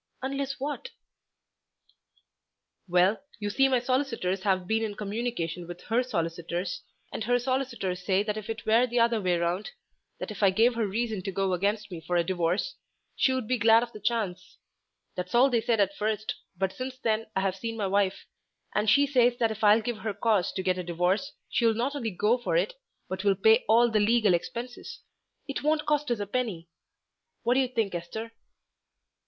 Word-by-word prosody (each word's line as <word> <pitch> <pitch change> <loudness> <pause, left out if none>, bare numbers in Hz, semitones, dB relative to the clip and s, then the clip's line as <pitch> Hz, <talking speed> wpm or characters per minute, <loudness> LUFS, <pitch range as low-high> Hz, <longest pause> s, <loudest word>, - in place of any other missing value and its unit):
"Unless 275 +1 -3
what?" 295 - -4 2.0
"Well, 180 +4 +3 0.2
you 205 -1 -3
see 270 +5 +4
my 260 -1 +3
solicitors 245 -7 -1
have 185 -2 +1
been 220 +4 +1
in 210 -2 -3
communication 200 -6 -3
with 175 0 -8
her 230 +3 +1
solicitors, 175 -3 -3 0.3
and - - -3
her 245 +1 +3
solicitors 245 -8 -2
say 190 +2 +2
that 210 -1 -2
if 215 +1 -7
it 225 0 -5
were 230 +3 +4
the 240 0 0
other 230 -1 +3
way 180 -2 +1
round, 170 +3 -1 0.5
that - - -5
if 215 - -8
I 200 - +6
gave 225 +6 +3
her 230 -2 0
reason 220 0 -2
to 195 - -4
go 190 0 0
against 205 +3 -1
me 170 -2 -6
for 175 - -2
a 170 - +3
divorce, 180 +7 0 0.4
she 265 - +3
would 260 -4 -2
be 255 0 0
glad 225 +2 +6
of 240 - -6
the 215 - -10
chance. 205 -4 -2 0.6
That's 180 +4 -4
all 260 +3 +5
they 235 -2 +2
said 225 -1 +1
at 200 0 +2
first, 215 0 -1 0.2
but 190 0 -1
since 255 0 -6
then 225 -3 -1
I've 190 -1 0
seen 225 +3 -5
my 210 - -1
wife, 195 0 0 0.5
and 210 +1 +1
she 285 +6 +5
says 245 -3 +3
that 230 -2 +1
if 220 0 -6
I'll 215 +2 +6
give 235 -1 -3
her 215 -2 -3
cause 215 -6 +1
to 190 - -3
get 185 -1 +1
a - - -3
divorce 180 - 0 0.2
she'll 230 -2 +2
not 255 +6 -1
only 240 -6 -2
go 210 +5 +1
for 240 - 0
it, - - 0 0.3
but 190 +1 -4
will 200 -1 +3
pay 220 +5 +4
all 235 +1 +5
the 215 - +3
legal 215 -2 +4
expenses; 240 +8 -4 0.5
it 275 - -3
won't 305 +1 +1
cost 295 -1 +1
us 240 -3 0
a 205 - -2
penny. 205 -7 -3 0.8
What 235 +1 +3
do 260 - +3
you 260 - +2
think 225 -6 -1
Esther?" 220 +7 -5
220 Hz, 195 wpm, -28 LUFS, 190-240 Hz, 2.0 s, I